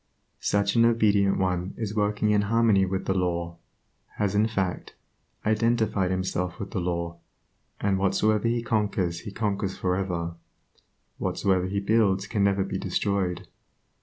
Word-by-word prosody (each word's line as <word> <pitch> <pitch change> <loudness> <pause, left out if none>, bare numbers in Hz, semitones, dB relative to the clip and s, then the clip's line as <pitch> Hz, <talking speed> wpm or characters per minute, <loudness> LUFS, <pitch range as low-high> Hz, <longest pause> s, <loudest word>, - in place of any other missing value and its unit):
Such 100 0 +1
an 115 - +5
obedient 105 -4 +3
one 90 0 -1
is 110 -2 -3
working 105 0 +1
in 105 -1 +3
harmony 110 -4 +4
with 95 0 -2
the 95 - +1
law, 85 -2 -1 0.6
has 105 -2 0
in 105 +2 +3
fact, 95 -5 -3 0.5
identified 110 -3 +1
himself 90 -1 -2
with - - -6
the - - -2
law, 85 -1 -3 0.6
and 100 -2 +1
whatsoever 105 +3 +2
he 120 0 0
conquers 100 -7 0
he 105 - -8
conquers 100 -2 -2
for 90 -1 0
ever, 85 -3 -2 0.9
whatsoever 95 -2 +1
he 100 +1 -1
builds 100 -2 +2
can 100 -1 0
never 100 -1 +2
be 95 - -4
destroyed. 95 -2 -1
100 Hz, 145 wpm, -26 LUFS, 95-105 Hz, 0.9 s, an